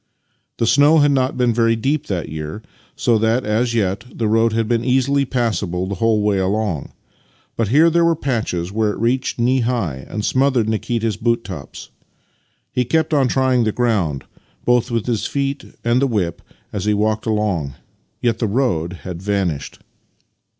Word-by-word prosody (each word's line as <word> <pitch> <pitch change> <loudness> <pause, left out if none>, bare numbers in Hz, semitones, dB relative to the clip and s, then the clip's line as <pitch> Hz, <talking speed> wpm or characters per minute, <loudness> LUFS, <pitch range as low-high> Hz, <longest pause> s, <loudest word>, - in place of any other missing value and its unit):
The 115 - +1
snow 145 +6 +5
had 145 -1 +4
not 130 -1 +1
been 125 -2 +2
very 115 0 +2
deep 135 +6 -1
that 90 -5 -2
year, 80 +7 -6 0.3
so 115 -2 +2
that, 115 +3 +1
as 115 +3 0
yet, 100 -1 0
the 115 - -2
road 115 +1 +3
had 115 0 0
been 115 0 +1
easily 135 +2 +2
passable 100 -8 -1
the 100 - -4
whole 110 -2 +2
way 105 -2 +2
along; 95 -4 -1 0.6
but 115 - 0
here 150 +9 +5
there 170 +1 +3
were 170 0 +3
patches 110 - -2
where 110 +1 +1
it 105 - -3
reached 120 +4 0
knee 125 +2 +2
high 110 - -2
and 105 0 -3
smothered 130 -4 +2
Nikita's 110 -1 -1
boot 115 +1 0
tops. 70 - -9 0.8
He 125 - +1
kept 160 +6 0
on 140 -3 +3
trying 130 -1 +2
the 110 - +1
ground, 100 - 0 0.4
both 125 0 +2
with 115 -2 -1
his 115 -4 -1
feet 140 0 -2 0.2
and 120 +2 +2
the 140 - +3
whip, 100 -9 -2 0.3
as 100 -2 -3
he 105 0 +2
walked 110 +2 0
along; 100 - -1 0.5
yet 115 -2 +1
the 115 - 0
road 100 -8 0
had 90 -2 -6
vanished. 95 -8 -2
115 Hz, 175 wpm, -19 LUFS, 100-125 Hz, 0.8 s, snow